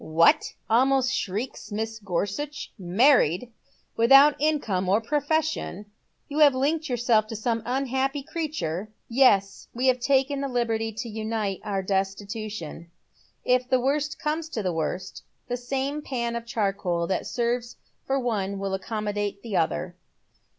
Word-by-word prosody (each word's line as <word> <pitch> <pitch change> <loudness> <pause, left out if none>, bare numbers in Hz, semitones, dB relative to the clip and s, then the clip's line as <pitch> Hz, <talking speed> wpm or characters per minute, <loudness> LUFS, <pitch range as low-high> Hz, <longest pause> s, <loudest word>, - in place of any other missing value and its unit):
" - - -13 0.2
What? - - +4
" - - -45
almost 265 0 +3
shrieks 210 +7 -3
Mrs. 220 +1 -4
Gorsuch. 205 - -3
" - - -37 0.2
Man 275 +2 +8
ied! 180 +11 -2 0.4
Without 275 +6 +7
income 220 -12 +1
or 200 +3 +4
profession, 295 - -1 0.4
you 290 +2 -3
have 290 -3 +7
linked 300 +4 0
yourself 235 -3 +2
to 225 - -6
some 225 +1 -1
unhappy 270 +2 -1
creature? 215 - -3
" - - -47
" - - -47 0.2
Yes, 195 -2 +1
we 250 +2 -1
have 255 -1 +4
taken 275 +2 +2
the 280 - -1
hberty 230 -3 -1
to - - -8
unite 215 -3 -3
our 195 -2 -2
destitution. 195 -3 -3 0.6
If 250 0 +2
the 255 - +4
worst 285 +4 0
comes 310 +2 -2
to 220 -8 -3
the 180 -2 0
worst 180 +4 -3 0.3
the 245 - -1
same 270 +4 -2
pan 235 -4 -3
of 235 0 -5
charcoal 195 -7 -1
that 185 +1 -2
serves 240 0 -1 0.3
for 270 0 +1
one 200 -6 -1
will 195 0 -3
accommodate 205 0 -3
the 225 -4 -4
other." 170 +1 0
235 Hz, 155 wpm, -26 LUFS, 200-270 Hz, 0.6 s, Man